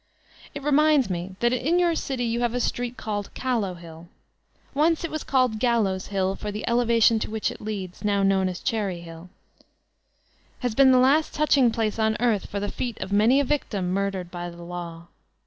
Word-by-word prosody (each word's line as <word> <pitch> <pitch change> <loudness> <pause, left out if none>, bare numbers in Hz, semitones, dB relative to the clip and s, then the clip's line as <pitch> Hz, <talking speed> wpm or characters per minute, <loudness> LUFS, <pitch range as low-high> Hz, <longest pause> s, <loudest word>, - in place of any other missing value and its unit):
It 285 - -6
ronindt 295 -5 +3
me 180 +2 -4
that 240 +1 +3
in 290 +8 +1
your 350 -1 +3
city 265 -6 -2
you 230 0 -1
have 240 0 0
a - - 0
street 245 0 -2
called 205 -2 -4
*'Callow 225 -8 -1
hill." 165 -1 -12 0.7
Once 315 +4 +2
it 335 - -3
was 310 - -4
called 255 -5 +1
Gallows' 215 -6 +1
Hill, 195 -1 -1
for 210 - -5
the 210 +1 -5
elevation 235 -1 +3
to - - -4
which 220 0 -1
it - - -11
leads, 200 -4 -6
now 200 -1 +1
known 190 -1 +2
as 180 - -6
''Cherry 200 -6 -2
Hill," 165 +1 -11 1.3
has 245 -3 -1
been 265 +3 +6
the 255 - +5
last 275 +5 +3
touching 285 -4 +4
place 225 -1 -2
on 220 0 +1
earth 230 -4 +1
for 200 - -3
the 205 0 -3
feet 240 -3 -4
of 195 - -5
many 225 +7 +4
a - - +3
victim 210 -10 -1
murdered 195 -2 -2
by 175 0 -5
the 170 0 -11
Law. 170 -1 -7
220 Hz, 200 wpm, -25 LUFS, 190-255 Hz, 1.3 s, been